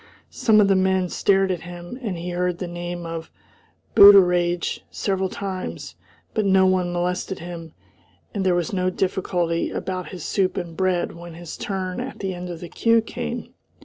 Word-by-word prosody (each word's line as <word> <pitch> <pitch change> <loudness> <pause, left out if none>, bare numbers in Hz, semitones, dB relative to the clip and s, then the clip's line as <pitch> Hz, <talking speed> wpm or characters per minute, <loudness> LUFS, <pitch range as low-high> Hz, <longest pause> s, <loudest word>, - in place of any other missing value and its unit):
Some 220 -2 +4
of 205 - +5
the 195 - +4
men 190 -1 +2
stared 195 0 +2
at 175 -3 -3
him, 175 +7 -8
and 205 -8 -3
he 175 +1 -5
heard 180 0 -1
the 180 - -4
name 175 0 -5
of 165 -1 -6 0.7
"Booteraidge" 180 -3 +6
several 190 -1 -1
times; 190 -2 -5 0.4
but 215 - +1
no 190 -1 +4
one 185 -1 +2
molested 180 +2 -2
him, 165 -2 -8 0.6
and 200 - -1
there 185 -2 +3
was 175 0 -1
no 185 -1 +1
difficulty 180 -2 -1
about 185 -1 -4
his 180 -5 -7
soup 195 0 0
and 170 -3 -4
bread 185 0 0
when 170 0 -10
his 170 -1 -8
turn 190 -1 -3
at 255 +2 -5
the 190 -1 -3
end 180 0 -6
of 170 -2 -7
the 175 - -6
queue 230 +5 +3
came. 225 - -5
180 Hz, 180 wpm, -23 LUFS, 175-190 Hz, 0.7 s, Booteraidge